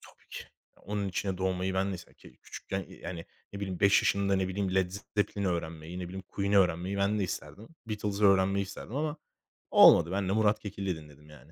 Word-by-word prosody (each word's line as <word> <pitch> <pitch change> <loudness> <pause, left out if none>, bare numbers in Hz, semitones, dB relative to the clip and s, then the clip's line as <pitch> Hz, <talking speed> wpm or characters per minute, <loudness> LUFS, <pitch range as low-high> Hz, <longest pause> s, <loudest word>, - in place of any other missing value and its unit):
tabii - - -19
ki, - - -7 0.3
onun 100 -1 -3
içine 95 0 -2
doğmayı 95 0 -1
ben 95 +1 +1
de - - -3
ise 85 -1 -11
ke - - -17
küçükken, - - -6
iii, - - -14
eee, - - -19
hani 85 -2 -6 0.3
ne 100 - -6
bileyim 95 -3 -4
5 100 -1 +5
yaşında, 100 0 +2
ne 95 -1 0
bileyim, 95 0 -2
Led 95 -2 +2
Z 100 +2 -7 0.2
Zepplin'i 100 -1 0
öğrenmeyi, 85 0 -4
ne 90 - -4
bileyim, 95 +1 -7
Queen 100 0 -2
öğrenmeyi 95 0 +2
ben 100 +2 +1
de 100 - 0
isterdim. 100 +4 -7 0.2
Beatles'ı 105 -1 -2
öğrenmeyi 100 0 +4
isterdim 105 +5 -8
ama 150 +1 -1 0.6
olmadı. 85 +1 +7
Ben 95 -1 -1
de 95 - +1
Murat 105 -1 +3
Kekilli 100 -3 -4
dinledim 75 -1 -14
yani. 75 0 -16
95 Hz, 215 wpm, -30 LUFS, 90-100 Hz, 0.6 s, olmadı